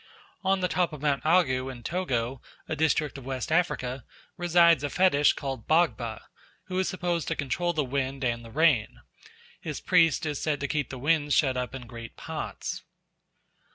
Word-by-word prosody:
On 190 0 +2
the 180 - +2
top 180 -2 0
of 150 - -8
Mount 140 -2 +1
Agu 135 -6 +2
in 120 -2 -11
Togo, 130 -7 -2 0.3
a 160 - -2
district 150 -2 +1
of - - -12
West 130 +1 -3
Africa, 135 -7 0 0.3
resides 170 -2 +4
a 145 - -1
fetish 165 -5 +4
called 135 -5 -5
Bagba, 155 -9 +1 0.4
who 185 0 -3
is 190 - +1
supposed 175 -3 -2
to - - -1
control 145 +6 -1
the 155 -3 0
wind 135 +1 -2
and 120 -1 -1
the 115 - -11
rain. 145 -5 +2 0.6
His 150 -3 -5
priest 165 -4 +3
is 150 -2 -3
said 150 -3 0
to 145 - -2
keep 145 0 -1
the 135 - -6
winds 145 +2 +2
shut 135 -6 +3
up 125 +1 -3
in 130 -2 -7
great 115 0 -9
pots. - - -5
145 Hz, 180 wpm, -27 LUFS, 130-170 Hz, 0.6 s, resides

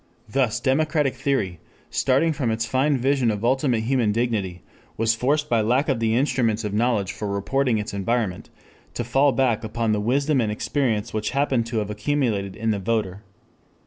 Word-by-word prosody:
Thus 115 0 0
democratic 150 +1 +1
theory, 125 - -1 0.3
starting 140 +5 +2
from 135 -5 -1
its 115 +1 -1
fine 135 +3 +1
vision 130 -1 +1
of 105 +1 -2
ultimate 130 -2 +2
human 120 -2 +1
dignity, 105 -6 -2 0.3
was 115 +1 +2
forced 145 +6 0
by 115 -5 +2
lack 125 +7 +1
of 130 -4 +1
the 115 0 +1
instruments 115 -4 +1
of 105 -1 -3
knowledge 105 -3 +1
for 105 - -5
reporting 115 +5 0
its 105 0 -4
environment, 100 -1 -2 0.5
to - - -2
fall 135 +4 +3
back 125 -4 +1
upon 115 0 -1
the 105 -1 +1
wisdom 140 +5 +1
and 110 -2 0
experience 110 -1 -1
which 110 0 -1
happened 130 -5 +1
to 115 -1 -3
have 105 -1 -1
accumulated 105 -4 -1
in 115 0 -1
the 105 - -1
voter. 100 -2 -2
115 Hz, 175 wpm, -23 LUFS, 105-135 Hz, 0.5 s, fall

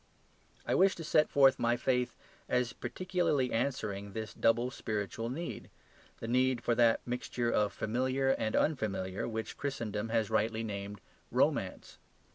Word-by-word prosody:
I - - 0
wish 190 0 +4
to 165 - -7
set 155 0 +3
forth 135 -2 +5
my 120 0 +2
faith 125 0 0 0.3
as 125 -1 +1
particularly 180 -8 -1
answering 105 -5 -2
this 110 0 -5
double 120 +2 +2
spiritual 110 0 -3
need, 165 +7 -5 0.5
the 115 - -5
need 125 0 +2
for 120 - +2
that 115 -1 +4
mixture 120 -1 -2
of 105 -2 +2
the - - -21
familiar 130 +4 0
and 110 -4 0
the - - +5
unfamiliar 100 -9 -1
which 110 -1 -4
Christendom 115 -6 -3
has 110 -2 0
rightly 110 +1 +1
named 100 -2 -5 0.3
romance. - - 0
120 Hz, 150 wpm, -32 LUFS, 110-130 Hz, 0.5 s, forth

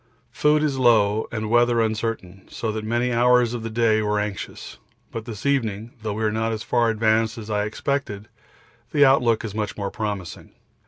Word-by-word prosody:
Food 150 +4 +2
is 140 -3 0
low 110 -4 +3
and 110 -1 -3
weather 120 0 +4
uncertain, 110 -4 -3
so 110 - -3
that 110 0 -4
many 120 +3 0
hours 125 0 +3
of 120 - -4
the 115 - -4
day 110 -1 +2
were 105 0 0
anxious; 105 -2 -6 0.3
but 115 -1 -6
this 110 0 -8
evening, 115 -5 -1
though 110 -2 -3
we 110 +2 -3
are 110 - +1
not 110 +1 -1
as 110 -1 -4
far 120 -1 +2
advanced 110 +1 +1
as 110 -1 -7
I 105 0 0
expected, 110 -2 -3 0.7
the 145 -1 +6
outlook 120 -4 +3
is 105 - -6
much 105 -1 -3
more 100 -1 -3
promising. 100 -6 -5
110 Hz, 190 wpm, -23 LUFS, 105-120 Hz, 0.7 s, the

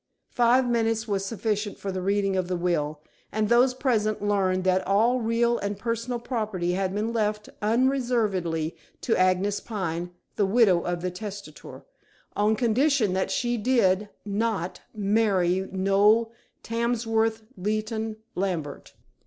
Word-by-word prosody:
Five 245 +1 +3
minutes 225 -1 0
was 200 -2 -1
sufficient 210 0 -2
for 195 - -4
the 185 0 -3
reading 195 0 +1
of 185 -1 0
the 180 -1 -1
will, 155 -4 -1 0.3
and 215 0 0
those 250 +2 +4
present 220 -5 0
learned 195 -2 +1
that 185 0 +1
all 225 +6 +3
real 235 +1 +1
and 200 0 -3
personal 230 +3 -2
property 215 -7 -2
had 190 +1 -1
been 220 +3 -1
left 210 -2 -1
unreservedly 215 - 0 0.3
to 230 - +1
Agnes 185 +2 +2
Pine, 175 -5 -4 0.3
the 205 - +3
widow 195 -5 +4
of 175 0 -3
the 180 - -1
testator, 200 +2 -9 0.5
on 210 +1 +2
condition 245 -2 +2
that 190 0 0
she 240 +4 0
did 210 -4 +2 0.2
not 205 -3 -2
marry 195 -3 +1
Noel 200 +4 +3 0.3
Tamsworth 225 -1 0
Leighton 215 +3 -2 0.2
Lambert. 170 -7 -4
210 Hz, 135 wpm, -26 LUFS, 190-230 Hz, 0.5 s, those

